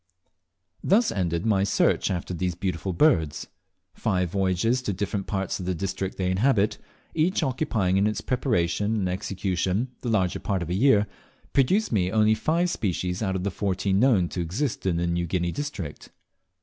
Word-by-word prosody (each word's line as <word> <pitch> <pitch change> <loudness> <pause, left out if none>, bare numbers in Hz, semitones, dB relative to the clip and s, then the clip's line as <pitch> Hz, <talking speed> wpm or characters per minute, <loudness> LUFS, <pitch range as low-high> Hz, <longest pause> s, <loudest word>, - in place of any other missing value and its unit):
Thus 215 +5 +3
ended 85 -2 -1
my 100 -3 +3
search 100 - +2
after 90 0 -3
these 90 0 -2
beautiful 90 +1 -2
birds. 85 - +2 0.5
Five 90 -3 -1
voyages 95 +6 +1
to 105 -5 -2
different 100 +1 -3
parts 95 -1 -2
of 90 - -5
the 95 - 0
district 95 +2 -3
they 90 -1 0
inhabit, 105 +1 +2 0.3
each 165 +2 +1
occupying 120 -9 0
in 100 +2 +3
its 105 - -1
preparation 105 - 0
and 100 -4 0
execution 95 +4 -1
the 120 - -3
larger 95 -5 +1
part 95 -4 -1
of 85 - -5
a - - +1
year, 105 0 +4 0.5
produced 185 +11 +2
me 95 -5 +1
only 110 0 +4
five 170 +9 +1
species 90 -3 -2
out 95 -3 -1
of 90 - -2
the 100 - -1
fourteen 95 +1 0
known 110 -8 +4
to 90 - -3
exist 100 - -2
in 85 -3 +1
the 85 - 0
New 85 0 -1
Guinea 85 0 -1
district. 125 - -6
95 Hz, 175 wpm, -25 LUFS, 90-115 Hz, 0.5 s, year